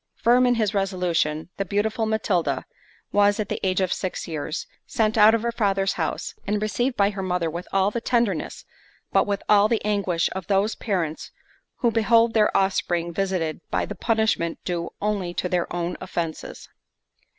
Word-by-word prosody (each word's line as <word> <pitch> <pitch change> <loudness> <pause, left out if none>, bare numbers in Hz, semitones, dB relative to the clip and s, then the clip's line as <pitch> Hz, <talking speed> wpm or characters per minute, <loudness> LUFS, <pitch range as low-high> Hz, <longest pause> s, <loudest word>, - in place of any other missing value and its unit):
Firm 250 +2 +4
in 245 - +3
his 220 -2 0
resolution, 180 -5 0
the 195 - 0
beautiful 215 +4 -1
Matilda, 185 -9 0 0.5
was, 205 0 +3
at 210 - -2
the - - -2
age 190 0 +1
of 185 - +1
six 185 - -4
years, 155 0 -4 0.2
sent 220 -1 +1
out 220 +1 +7
of 230 - -2
her 235 - 0
father's 195 -4 +1
house, - - -3
and 210 +1 +1
received 240 +4 -1
by 200 0 +3
her 195 -1 -5
mother 180 -3 -1
with 170 +3 -6
all 195 +1 +2
the 235 - -3
tenderness, 235 -9 -1 0.5
but - - +3
with 200 -1 -2
all 210 0 +6
the 225 -1 -1
anguish, 200 -5 +1
of 190 -2 -6
those 200 +2 +2
parents, 175 -8 -3 0.5
who 235 - +3
behold 230 +1 +3
their 210 -1 +3
offspring 175 -3 0
visited 180 -4 -1
by - - 0
the - - -6
punishment 220 -7 0
due 170 -2 -2
only 195 -4 -1
to - - -1
their 180 -1 -1
own 175 0 -2
offences. 170 -3 -5
195 Hz, 175 wpm, -24 LUFS, 175-215 Hz, 0.5 s, out